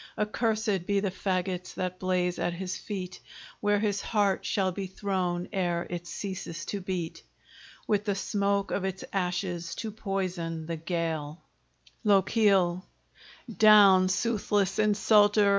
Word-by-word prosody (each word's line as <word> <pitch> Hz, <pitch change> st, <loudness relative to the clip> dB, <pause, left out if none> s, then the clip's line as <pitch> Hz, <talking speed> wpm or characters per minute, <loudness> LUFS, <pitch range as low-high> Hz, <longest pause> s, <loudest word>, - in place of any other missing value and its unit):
Accursed 210 Hz, -3 st, 0 dB
be 200 Hz, -1 st, +2 dB
the 195 Hz, -1 st, -1 dB
fagots 185 Hz, -1 st, -2 dB
that 185 Hz, 0 st, -3 dB
blaze 180 Hz, -1 st, 0 dB
at 175 Hz, -, 0 dB
his 185 Hz, +1 st, -4 dB
feet, 185 Hz, -3 st, -6 dB, 0.4 s
Where 205 Hz, 0 st, +2 dB
his 205 Hz, -1 st, 0 dB
heart 205 Hz, -3 st, +1 dB
shall 190 Hz, -2 st, +1 dB
be 195 Hz, +1 st, -4 dB
thrown 185 Hz, -2 st, -2 dB
ere 175 Hz, -3 st, 0 dB
it 175 Hz, 0 st, -5 dB
ceases 180 Hz, -4 st, -5 dB
to 200 Hz, -, -4 dB
beat, 180 Hz, -3 st, -4 dB, 0.6 s
With 205 Hz, -1 st, 0 dB
the 200 Hz, -2 st, 0 dB
smoke 200 Hz, 0 st, 0 dB
of 195 Hz, -, -1 dB
its 190 Hz, -1 st, -3 dB
ashes 180 Hz, -2 st, -2 dB
to 220 Hz, -, -4 dB
poison 185 Hz, -6 st, -3 dB
the 165 Hz, 0 st, -4 dB
gale 160 Hz, -2 st, -3 dB, 0.6 s
LOCHIEL 195 Hz, -3 st, +3 dB, 0.7 s
Down, 200 Hz, -4 st, +7 dB
soothless 205 Hz, -1 st, 0 dB
insulter! 210 Hz, 0 st, +4 dB
190 Hz, 130 wpm, -28 LUFS, 180-205 Hz, 0.7 s, Down